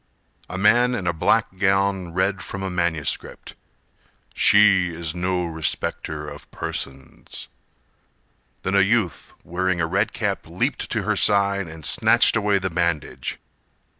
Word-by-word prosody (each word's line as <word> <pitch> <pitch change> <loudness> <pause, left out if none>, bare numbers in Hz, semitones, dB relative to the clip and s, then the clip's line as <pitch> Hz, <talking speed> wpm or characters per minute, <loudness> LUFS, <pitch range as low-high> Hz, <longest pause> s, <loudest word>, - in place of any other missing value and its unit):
A 90 - -5
man 120 +5 +4
in 100 - -4
a 85 - +1
black 95 +4 +1
gown 95 -2 +1
read 95 +2 0
from 100 -1 -6
a 95 - -3
manuscript: 85 -4 -2 0.8
"She 100 -3 +5
is 80 -1 -4
no 90 0 -1
respecter 80 -2 -3
of - - -10
persons." 65 -1 -5 1.1
Then 95 - -1
a 100 - +5
youth 100 -4 0
wearing 90 0 -1
a 85 - +1
red 80 - 0
cap - - -3
Leaped - - -2
to - - -1
her - - 0
side 100 -2 +2
and 80 -2 -9
snatched - - +4
away 105 -2 +2
the 95 -1 -2
bandage. 85 -3 -2
95 Hz, 135 wpm, -22 LUFS, 85-100 Hz, 1.1 s, She